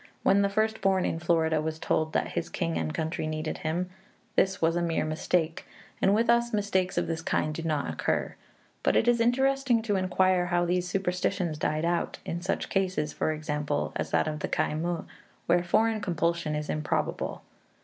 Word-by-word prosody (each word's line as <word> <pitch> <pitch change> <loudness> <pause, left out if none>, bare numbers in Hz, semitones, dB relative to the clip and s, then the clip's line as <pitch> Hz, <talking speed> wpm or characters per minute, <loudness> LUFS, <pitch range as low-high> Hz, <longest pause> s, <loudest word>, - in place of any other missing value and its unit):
When 200 +1 +5
the 200 - +2
first 220 +2 0
born 190 -1 +2
in 165 - -1
Florida 160 -2 +2
was 155 0 -3
told 155 0 0
that - - 0
his - - -3
king 80 0 -2
and 80 -1 -1
country 160 - -2
needed 155 0 -3
him, 175 +3 -2 0.4
this 190 0 +2
was 165 +1 +2
a 175 - +1
mere 165 -2 0
mistake, 160 +1 -1 0.3
and 195 +1 +4
with 230 +2 +2
us 235 0 +3
mistakes 200 -3 0
of - - +2
this 160 -1 -3
kind 155 -1 0
do 165 - -4
not 155 -3 -1
occur. - - -1 0.5
But - - +2
it 230 - +3
is 240 -1 +4
interesting 260 0 +2
to 205 -3 +1
inquire 185 -1 +2
how 175 0 +2
these 180 +1 0
superstitions 180 -3 -1
died 155 +1 0
out, 170 0 0
in 170 - -3
such 185 - -2
cases, 185 -6 0
for - - 0
example, 150 - -2
as - - -2
that - - +2
of 155 -1 -3
Khai - - 0
muh, 170 +2 -2 0.4
where 175 +1 +3
foreign 220 +5 +2
compulsion 170 -4 0
is 150 0 -3
improbable. 150 0 -2
175 Hz, 190 wpm, -28 LUFS, 155-195 Hz, 0.5 s, When